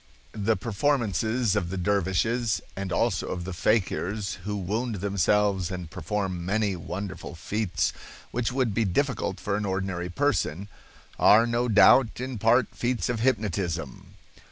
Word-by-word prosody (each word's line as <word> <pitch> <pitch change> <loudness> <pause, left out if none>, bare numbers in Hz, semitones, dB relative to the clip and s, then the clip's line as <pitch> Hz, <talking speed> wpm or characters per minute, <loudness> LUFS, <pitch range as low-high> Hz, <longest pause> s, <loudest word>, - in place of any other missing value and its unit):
The 110 +1 0
performances 110 - 0
of 90 -4 -1
the 95 - -4
dervishes, 100 +5 +1 0.2
and 95 -1 -4
also - - 0
of 90 -1 -4
the 95 +1 -5
fakirs, 100 0 0
who 105 0 -2
wound 110 +5 -2
themselves 100 -1 +1
and 90 -4 -6
perform 90 0 -3
many 100 +1 0
wonderful 90 +1 -6
feats 90 +1 -1 0.4
which 120 +1 -1
would 125 -4 0
be 115 - +1
difficult 115 0 -1
for 100 0 -2
an 105 - -2
ordinary 95 -2 -2
person, 100 - -1 0.5
are 110 +3 +6
no 120 +1 0
doubt 115 +3 +5
in 130 -2 -4
part 115 +3 +3
feats 120 -1 -1
of 120 -2 -1
hypnotism. 90 - -2
100 Hz, 140 wpm, -26 LUFS, 95-115 Hz, 0.5 s, are